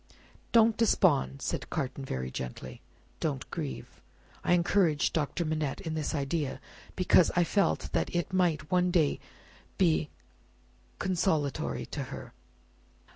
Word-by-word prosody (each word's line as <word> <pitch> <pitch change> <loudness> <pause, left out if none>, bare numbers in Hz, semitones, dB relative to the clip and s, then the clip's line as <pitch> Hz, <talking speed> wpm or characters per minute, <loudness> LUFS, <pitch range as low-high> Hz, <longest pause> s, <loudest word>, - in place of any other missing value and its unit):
"Don't 225 -1 +5
despond," 160 -11 +2
said - - -3
Carton, 135 -2 -3
very 65 - -4
gently; 65 0 -6 0.4
"don't 140 -5 -2
grieve. 155 -5 -6 0.4
I - - +3
encouraged 175 -3 +2
Doctor 160 +2 -1
Manette 155 -3 -2
in 160 - -4
this 155 0 -2
idea, 145 0 -2 0.4
because 180 -1 +5
I 175 - +4
felt 195 +4 +1
that - - -1
it 175 +2 -1
might 160 -5 +1
one 180 0 +3
day 165 -5 +2 0.6
be 160 -5 +2 0.9
consolatory 165 -6 0
to - - -5
her. - - -9
160 Hz, 125 wpm, -30 LUFS, 140-180 Hz, 0.9 s, Don't